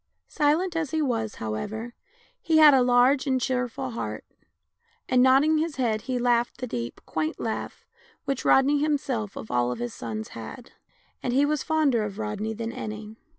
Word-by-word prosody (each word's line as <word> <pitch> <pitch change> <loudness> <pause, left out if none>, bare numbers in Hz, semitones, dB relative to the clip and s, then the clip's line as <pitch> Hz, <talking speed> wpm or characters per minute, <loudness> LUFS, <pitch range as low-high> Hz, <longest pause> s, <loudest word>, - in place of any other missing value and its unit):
Silent 325 +4 +1
as 320 -3 -1
he 315 - -1
was, 230 -7 -1
however, 210 - -5 0.5
he 320 -1 +2
had 305 -2 +9
a 265 - +5
large 250 +3 +4
and 260 -1 +2
cheerful 255 0 -2
heart, 235 - -5 0.8
and 250 -1 +3
nod 260 +1 +6
ding 310 +1 +2
his 320 -1 -2
head 225 -5 0
he 255 +1 -3
laughed 240 -1 +1
the 255 - -4
deep, 120 - -5
quaint 155 0 -3
laugh 225 - -4 0.4
which 275 -2 -2
Rodney 280 +2 +4
himself 270 -9 -1
of - - -8
all 120 0 +1
his 120 0 -5
sons 110 -2 -6
had 115 - -9 0.3
— - - -38
and 245 - -2
he 280 +2 +4
was 300 -1 0
fonder 305 -7 +2
of 205 -1 -5
Rodney 215 0 -3
than 225 +1 -4
any. 215 -1 -7
245 Hz, 180 wpm, -26 LUFS, 215-280 Hz, 0.8 s, had